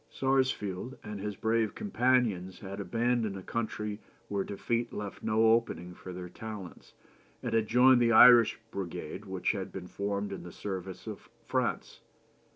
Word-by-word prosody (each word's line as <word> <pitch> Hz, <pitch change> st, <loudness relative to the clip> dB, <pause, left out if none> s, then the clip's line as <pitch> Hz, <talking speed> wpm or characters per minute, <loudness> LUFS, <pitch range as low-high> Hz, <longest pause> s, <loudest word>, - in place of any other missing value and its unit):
Sarsfield 130 Hz, -4 st, 0 dB
and 105 Hz, -1 st, -6 dB
his 105 Hz, +1 st, -4 dB
brave 110 Hz, +1 st, 0 dB
companions 125 Hz, -, +1 dB
had 100 Hz, 0 st, -7 dB
abandoned 115 Hz, -1 st, 0 dB
a 95 Hz, -, -8 dB
country 105 Hz, -2 st, -3 dB, 0.3 s
where 100 Hz, -1 st, 0 dB
defeat 115 Hz, +4 st, -2 dB
left 105 Hz, -1 st, -6 dB
no 110 Hz, +1 st, +3 dB
opening 115 Hz, -6 st, -1 dB
for 90 Hz, -, -9 dB
their 90 Hz, 0 st, -6 dB
talents, 100 Hz, -1 st, -9 dB, 0.5 s
and -, -, -2 dB
had 110 Hz, -1 st, +2 dB
joined 125 Hz, +1 st, +6 dB
the 115 Hz, -1 st, +4 dB
Irish 120 Hz, 0 st, +8 dB
Brigade 95 Hz, -4 st, -5 dB
which 95 Hz, -1 st, -1 dB
had 95 Hz, -2 st, -5 dB
been 90 Hz, -1 st, -7 dB
formed 100 Hz, +2 st, -3 dB
in 95 Hz, -, -5 dB
the 90 Hz, -, -9 dB
service 95 Hz, 0 st, -6 dB
of -, -, -8 dB, 0.2 s
France.... -, -, -2 dB
105 Hz, 155 wpm, -30 LUFS, 95-115 Hz, 0.5 s, Irish